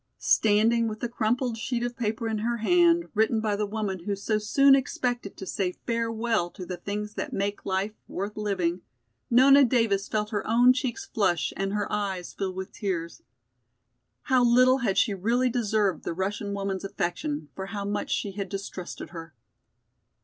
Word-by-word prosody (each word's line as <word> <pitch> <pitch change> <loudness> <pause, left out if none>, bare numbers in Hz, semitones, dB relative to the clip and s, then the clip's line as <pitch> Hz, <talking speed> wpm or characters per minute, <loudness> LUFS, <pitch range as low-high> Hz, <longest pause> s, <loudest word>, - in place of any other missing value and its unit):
Standing 225 +2 +3
with 215 0 -5
the 240 - -2
crumpled 235 0 -1
sheet 240 0 -2
of 240 0 -3
paper 225 0 -2
in 220 -1 -1
her 235 +2 -1
hand, 340 +7 +3
written 220 +1 +2
by 215 -2 0
the 210 0 -1
woman 200 -4 -3
who 205 - -1
so 215 +2 -1
soon 275 +6 +5
expected 245 -5 -1
to 190 - -7
say 185 -1 -2
farewell 230 -4 0
to 180 - -9
the 180 0 -5
things 210 +3 -4
that - - -5
make 200 +1 -2
life 195 +2 -1
worth 200 +2 -4
living, 185 -4 -1 0.5
Nona 275 +4 +7
Davis 230 -6 +2
felt 210 0 -2
her 205 -2 -1
own 245 +3 +6
cheeks 260 +9 -3
flush 195 - 0
and 195 0 -2
her 205 -1 0
eyes 195 -4 -2
fill 195 -2 -3
with 190 0 -6
tears. 175 -6 -4 1.0
How 255 -2 +3
little 255 +2 +5
had 205 -6 0
she 210 +1 +3
really 235 +6 +1
deserved 210 -6 0
the 165 - -3
Russian 200 +2 -2
woman's 195 -1 -3
affection, 170 -6 -3
for 190 0 -6
how 200 -1 -4
much 205 0 -2
she 200 - -1
had 195 -1 -5
distrusted 195 -2 -6
her! 165 -4 -9
210 Hz, 175 wpm, -27 LUFS, 195-235 Hz, 1.0 s, Nona